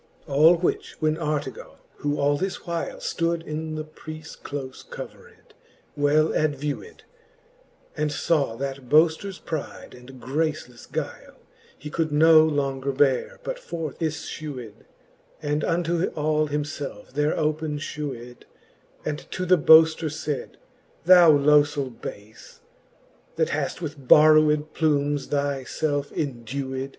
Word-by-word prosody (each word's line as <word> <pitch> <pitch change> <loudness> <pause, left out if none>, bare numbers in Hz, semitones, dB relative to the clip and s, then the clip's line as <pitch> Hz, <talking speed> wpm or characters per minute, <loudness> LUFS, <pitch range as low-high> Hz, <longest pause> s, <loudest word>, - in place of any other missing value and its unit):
All 155 +4 +5
which 175 +1 -2
when 155 0 +1
Artegall^ 150 -5 -4 0.2
who 145 0 -2
all 145 0 +3
this 190 +6 -4
while 170 -2 -4
Stood 165 0 -1
in 155 0 -5
the 155 - -3
preafie 155 +1 -10
clofe 135 -2 -7
covered, - - -11 0.4
well 150 +2 +2
advewed, 150 - -2 0.9
And 150 -2 -1 0.2
(aw 140 -8 +2
that 135 0 -5
boafters 165 +5 +3
pride 160 -3 -6
and 125 +1 -13
gracelefle 140 -1 -3
guile, - - -5 0.4
He 150 +2 -9
could 160 -2 -1
no 155 +1 +7
longer 140 -3 -1
beare, 135 -1 +1
but - - -4
forth 165 - -6
iffewed, 145 -7 -5 0.5
And 150 -1 -1
unto 170 0 0
all 155 0 +1
himielfe 145 -6 -5
there 150 +3 0
open 155 0 -1
fhewed, 130 -5 -6 0.6
And 150 - -2
to 185 - -3
the 180 -1 +4
boafter 160 +1 +6
faid, 150 -2 -5 0.5
Thou 175 -2 +8
lofell 145 -2 +4
bafe, 105 0 -10 0.8
That - - +1
haft 175 - -3
with 145 -4 -7
borrowed 155 0 +5
plumes 145 -2 +1
thy 140 -2 -1
felfe 145 +1 -2
endewed. 135 0 -3
150 Hz, 120 wpm, -24 LUFS, 140-160 Hz, 0.9 s, Thou